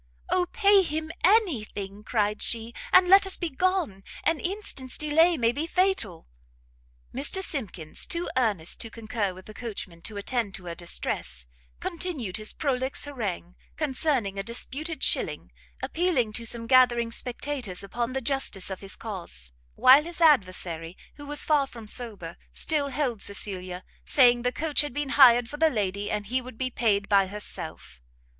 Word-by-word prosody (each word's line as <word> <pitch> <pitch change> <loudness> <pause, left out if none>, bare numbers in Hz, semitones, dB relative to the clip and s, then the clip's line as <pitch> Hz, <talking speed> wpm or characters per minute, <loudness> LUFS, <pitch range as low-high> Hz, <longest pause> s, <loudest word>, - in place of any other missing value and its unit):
"O 360 -1 +2
pay 405 -3 +5
him 315 -2 -3
any 375 - +4
thing!" 200 0 -8
cried 210 -2 0
she, 230 0 -2 0.2
"and 370 -1 +7
let 390 +1 +7
us 380 - 0
be 345 - -2
gone! 335 - 0 0.2
an 325 -2 +2
instant's 355 -9 -2
delay 320 +3 +3
may 230 -3 +2
be 295 +6 -3
fatal!" 360 - 0 0.9
Mr 290 +9 0
Simkins, 195 - -2
too 340 +1 -2
earnest 210 -10 0
to 225 - -5
conquer 215 -4 -3
the 215 - -12
coachman 195 -7 -7
to 210 +4 -6
attend 205 -1 -2
to 185 - -9
her 170 - -4
distress, 65 - -3 0.3
continued 310 - -3
his 215 0 -3
prolix 265 -2 -1
harangue 205 -11 -4 0.2
concerning 265 -9 0
a - - -2
disputed 280 +8 -1
shilling, - - +1 0.3
appealing 320 -11 0
to 230 +2 -1
some 230 0 -3
gathering 240 -2 +4
spectators 245 -5 -2
upon 235 +5 -3
the 265 - -2
justice 240 -7 0
of 190 - -6
his 195 -1 -6
cause; 170 - -6 0.2
while 270 +4 +7
his 345 +1 -7
adversary, 185 - +2 0.2
who 290 -1 -10
was 295 0 -1
far 290 -3 +3
from 230 -4 -11
sober, 210 -7 -7
still 300 -3 0
held 260 -6 -2
Cecilia, 185 -3 -3 0.2
saying 245 -3 +5
the 250 +1 0
coach 300 +4 +1
had 295 -4 -5
been 290 -1 -2
hired 245 -4 +7
for 295 - -7
the 320 +1 +4
lady, 205 -4 -2
and 210 -1 -2
he 255 +5 -1
would 250 -2 -11
be 255 +1 -2
paid 205 -5 +1
by 200 -2 +4
herself. 205 - -7
240 Hz, 165 wpm, -27 LUFS, 200-295 Hz, 0.9 s, and